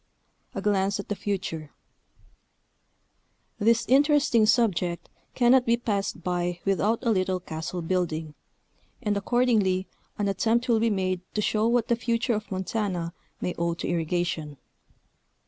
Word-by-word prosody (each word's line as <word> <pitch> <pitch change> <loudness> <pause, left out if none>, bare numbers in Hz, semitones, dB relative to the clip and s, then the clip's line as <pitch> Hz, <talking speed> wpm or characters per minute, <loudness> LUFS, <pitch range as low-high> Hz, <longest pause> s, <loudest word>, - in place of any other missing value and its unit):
A - - -3
GLANCE 200 -1 +1
AT 200 - -6
THE 205 - -1
FUTURE. 175 -7 -3 1.9
This 230 +2 +3
interesting 275 -5 +4
subject 180 -8 +1 0.3
cannot 250 +1 +5
be 235 -1 +2
passed 200 -7 -2
by 175 0 -1
without 200 +3 +2
a 230 - +3
little 185 -2 +1
castle 165 +1 -5
building, 165 -3 -1 0.7
and 210 -2 +1
accordingly 200 -4 +2 0.3
an 205 - 0
attempt 225 +5 +1
will 230 -2 +3
be 230 +1 +2
made 185 -3 -1
to 210 - +1
show 215 +2 +1
what 235 -1 +2
the 235 - +3
future 230 +1 0
of 210 -1 -3
Montana 185 -3 -2 0.3
may 180 - -1
owe 170 0 0
to - - -4
irrigation. 165 -3 -2
200 Hz, 135 wpm, -26 LUFS, 175-230 Hz, 1.9 s, cannot